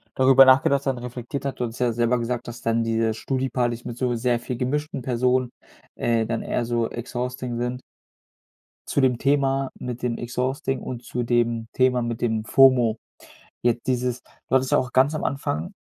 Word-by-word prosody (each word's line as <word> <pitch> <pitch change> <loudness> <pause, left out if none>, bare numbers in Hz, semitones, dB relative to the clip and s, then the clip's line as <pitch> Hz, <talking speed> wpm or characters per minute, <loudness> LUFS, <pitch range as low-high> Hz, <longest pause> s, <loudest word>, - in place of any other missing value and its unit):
darüber 135 0 +7
nachgedacht 135 +1 +4
hat 135 -2 +1
und 120 - -9
reflektiert 125 +3 -6
hat 135 -1 -4
und 120 -1 -1
du 115 - -11
hast - - -11
ja 125 -1 +2
selber 120 +1 +1
gesagt, 120 +1 -3
dass 120 0 -8
dann 115 0 +1
diese 115 -1 0
Studi-Partys 125 -2 -2
mit 120 -1 -7
so 125 -1 0
sehr 120 0 +1
viel 120 +1 -5
gemischten 145 +3 -2
Personen 125 0 +1 0.5
äh, 115 -1 +1
dann 115 0 -2
eher 120 - -1
so 115 -1 0
exhausting 125 +1 -4
sind. 125 +1 -3 1.1
Zu - - +1
dem 130 -3 +2
Thema 135 -1 +1
mit 125 0 -6
dem 120 -2 -1
exhausting 130 +2 -2
und 125 -1 -6
zu 120 0 -3
dem 120 -1 0
Thema 130 -1 +2
mit 115 -1 -3
dem 110 -2 0
Fomo. 125 -3 +5 0.6
Jetzt 120 0 0
dieses 125 -1 -1
du - - -7
hattest 130 0 +2
ja - - +5
auch 125 -1 -2
ganz 135 +4 +3
am 155 - -3
Anfang 85 - -2
125 Hz, 190 wpm, -24 LUFS, 120-130 Hz, 1.1 s, darüber